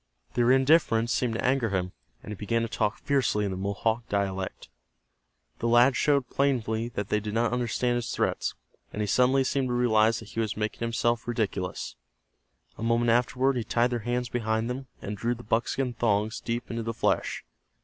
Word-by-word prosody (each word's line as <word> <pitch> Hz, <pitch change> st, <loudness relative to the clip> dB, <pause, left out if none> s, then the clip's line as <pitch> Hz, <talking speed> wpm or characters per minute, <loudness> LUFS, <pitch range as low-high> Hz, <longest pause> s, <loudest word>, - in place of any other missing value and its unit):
Their 120 Hz, 0 st, +3 dB
indifference 130 Hz, -4 st, +4 dB
seemed 120 Hz, -3 st, 0 dB
to -, -, -2 dB
anger 130 Hz, -2 st, +2 dB
him, 90 Hz, -2 st, -1 dB, 0.3 s
and -, -, -8 dB
he -, -, -4 dB
began 115 Hz, +4 st, -1 dB
to -, -, -1 dB
talk 110 Hz, -2 st, -1 dB
fiercely 135 Hz, -7 st, +1 dB
in 100 Hz, -, -2 dB
the -, -, -3 dB
Mohawk 110 Hz, +4 st, -1 dB
dialect. 95 Hz, -2 st, -2 dB, 0.9 s
The 115 Hz, -, -1 dB
lads 120 Hz, +2 st, +5 dB
showed 140 Hz, -4 st, +2 dB
plainly 120 Hz, -5 st, 0 dB
that 105 Hz, 0 st, -3 dB
they 105 Hz, -, +2 dB
did 105 Hz, 0 st, -5 dB
not 120 Hz, +1 st, +1 dB
understand 120 Hz, 0 st, 0 dB
his 120 Hz, -2 st, -3 dB
threats, -, -, -1 dB, 0.4 s
and 105 Hz, -, -4 dB
he -, -, 0 dB
suddenly 130 Hz, +6 st, +3 dB
seemed 130 Hz, 0 st, 0 dB
to 125 Hz, -, -2 dB
realize 115 Hz, -2 st, +3 dB
that -, -, -9 dB
he -, -, -5 dB
was 110 Hz, -2 st, -1 dB
making 105 Hz, 0 st, -2 dB
himself 115 Hz, 0 st, 0 dB
ridiculous. 105 Hz, -6 st, -3 dB, 0.8 s
A -, -, -4 dB
moment 115 Hz, 0 st, +2 dB
afterward 125 Hz, +2 st, +2 dB
he 120 Hz, -, -1 dB
tied 120 Hz, +2 st, +1 dB
their 120 Hz, -, -1 dB
hands 120 Hz, +2 st, -2 dB
behind 115 Hz, 0 st, -1 dB
them, 130 Hz, +1 st, -6 dB, 0.2 s
and 105 Hz, -, -4 dB
drew 120 Hz, +4 st, -1 dB
the 120 Hz, -, -11 dB
buckskin 120 Hz, +3 st, 0 dB
thongs 110 Hz, -1 st, 0 dB
deep 120 Hz, +1 st, -4 dB
into 115 Hz, 0 st, -2 dB
the 115 Hz, 0 st, -4 dB
flesh. -, -, 0 dB
115 Hz, 190 wpm, -27 LUFS, 110-125 Hz, 0.9 s, lads